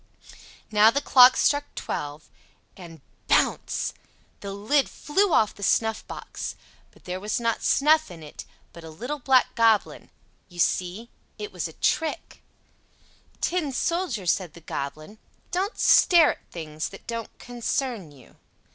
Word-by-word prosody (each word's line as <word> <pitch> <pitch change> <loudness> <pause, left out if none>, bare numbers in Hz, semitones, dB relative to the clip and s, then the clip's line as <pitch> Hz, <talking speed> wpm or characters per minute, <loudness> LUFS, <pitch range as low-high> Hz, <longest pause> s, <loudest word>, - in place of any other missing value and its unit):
Now 215 +1 +6
the 275 - +1
clock 255 -2 +7
struck 290 0 +2
twelve—and, 155 +2 -9 0.3
bounce!—the 200 - -2
lid 220 +9 +1
flew 385 +6 0
off 215 -8 +3
the - - -15
snuffbox; 220 +2 -2 0.3
but - - -24
there 180 +1 -5
was 210 +4 -2
not 230 -1 -1
snuff 310 +2 +3
in 165 -3 -11
it, 150 - -10 0.3
but 170 +1 -12
a 160 - -9
little 245 - -6
black 260 -1 +3
goblin; 225 -2 +1 0.4
you 175 - -15
see, 185 +6 -1 0.3
it 420 0 -6
was - - -4
a - - -12
trick. 320 0 -2 1.0
"Tin 340 -5 -1
Soldier," 295 - -2
said 175 -2 0
the 170 - -13
Goblin, 155 +7 -6 0.3
"don't 385 +5 -2
stare 340 -5 +6
at - - -13
things 155 -2 -6
that 195 - -13
don't 230 -1 -6
concern 240 - -3
you." 135 -3 -19
225 Hz, 135 wpm, -25 LUFS, 175-285 Hz, 1.0 s, clock